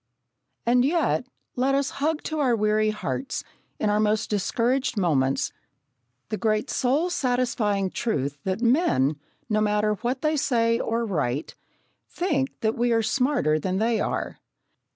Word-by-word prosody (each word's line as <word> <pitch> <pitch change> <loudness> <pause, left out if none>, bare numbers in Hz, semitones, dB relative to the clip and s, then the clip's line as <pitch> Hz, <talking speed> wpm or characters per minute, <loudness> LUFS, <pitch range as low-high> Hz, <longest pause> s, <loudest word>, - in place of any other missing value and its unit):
And 245 +1 +4
yet, 295 -3 +1 0.3
let 265 +2 +2
us 280 0 0
hug 310 +1 0
to 315 -1 -3
our 255 -5 +3
weary 215 0 +2
hearts, 215 +5 -3 0.3
in 210 - +1
our 210 - +2
most 215 0 +1
discouraged 235 +5 0
moments, 135 -8 +1 0.8
the 215 - -2
great 215 +2 0
soul 285 +8 +1
satisfying 235 - 0
truth 145 - -2
that 190 +3 -2
men, 230 - +2 0.3
no 215 -2 +1
matter 210 0 +2
what 245 +6 -3
they 310 0 +2
say 230 -4 +2
or 230 +1 -1
write, 145 - -2 0.6
think 290 -7 -1
that 220 0 +1
we 240 +1 +1
are 225 -1 +3
smarter 245 - +1
than 185 +4 -1
they 225 +2 +1
are. - - -2
230 Hz, 145 wpm, -25 LUFS, 210-260 Hz, 0.8 s, And